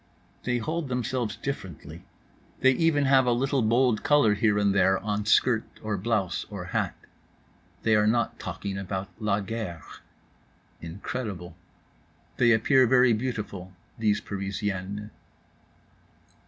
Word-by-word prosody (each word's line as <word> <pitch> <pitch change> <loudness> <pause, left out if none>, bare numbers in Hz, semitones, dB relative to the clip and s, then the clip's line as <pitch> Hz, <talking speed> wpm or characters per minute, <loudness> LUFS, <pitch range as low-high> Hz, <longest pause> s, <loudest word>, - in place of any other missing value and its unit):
They 125 -1 +1
hold 155 +5 -3
themselves 125 -2 -2
differently. 115 - -6 0.6
They 130 - +6
have 130 - -2
even 150 -3 +3
a 130 -2 +4
little 135 +3 +1
bold 120 0 +2
color 145 -8 +4
here 105 0 +2
and 100 -1 +2
there 95 0 +3
on 105 +1 -3
skirt 110 0 +4 0.2
or 105 -1 -1
blouse 100 -3 -1
or - - -6
hat. - - 0 0.9
They 110 -1 +3
are 105 0 +3
not 115 +1 0
talking 95 +2 -5
about 95 0 -4
La 105 -2 0
Guerre. 100 -6 -5 1.0
Incredible. 90 0 -6 0.8
They 120 -1 +4
appear 125 +3 +4
very 125 -1 +5
beautiful, 105 -6 -4 0.3
these 105 -2 +2
Parisiennes. 100 +1 -4
110 Hz, 125 wpm, -27 LUFS, 100-125 Hz, 1.0 s, They